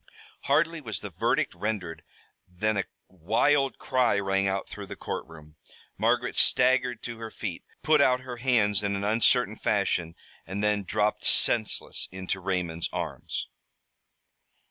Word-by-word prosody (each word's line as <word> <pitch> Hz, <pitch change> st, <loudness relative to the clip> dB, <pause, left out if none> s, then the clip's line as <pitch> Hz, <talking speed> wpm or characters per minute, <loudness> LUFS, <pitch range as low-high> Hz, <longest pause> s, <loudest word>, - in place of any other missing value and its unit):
Hardly 165 Hz, +3 st, +2 dB
was 110 Hz, -7 st, -4 dB
the 105 Hz, -, -7 dB
verdict -, -, 0 dB
rendered 100 Hz, -7 st, -3 dB, 0.5 s
than 105 Hz, +5 st, -1 dB
a 95 Hz, -, 0 dB, 0.2 s
wild 115 Hz, -, +1 dB
cry 125 Hz, -5 st, +2 dB
rang 95 Hz, 0 st, +1 dB
out 95 Hz, 0 st, -1 dB
through -, -, -8 dB
the -, -, -7 dB
courtroom. 75 Hz, -1 st, -7 dB, 0.4 s
Margaret -, -, +1 dB
staggered 125 Hz, -2 st, +3 dB
to 120 Hz, -1 st, -6 dB
her 115 Hz, -1 st, -6 dB
feet, 100 Hz, -6 st, -5 dB, 0.2 s
put 155 Hz, -2 st, +5 dB
out 125 Hz, -2 st, +4 dB
her 125 Hz, -2 st, -7 dB
hands 115 Hz, -5 st, +2 dB
in 100 Hz, -1 st, -1 dB
an 100 Hz, -, -3 dB
uncertain 110 Hz, +1 st, +3 dB
fashion, 90 Hz, -5 st, 0 dB, 0.3 s
and 95 Hz, +3 st, -3 dB
then 105 Hz, -1 st, +1 dB
dropped 105 Hz, +2 st, 0 dB
senseless 110 Hz, -3 st, +1 dB
into 95 Hz, 0 st, -3 dB
Raymond's 90 Hz, -3 st, -2 dB
arms. -, -, -4 dB
105 Hz, 140 wpm, -27 LUFS, 95-125 Hz, 0.5 s, put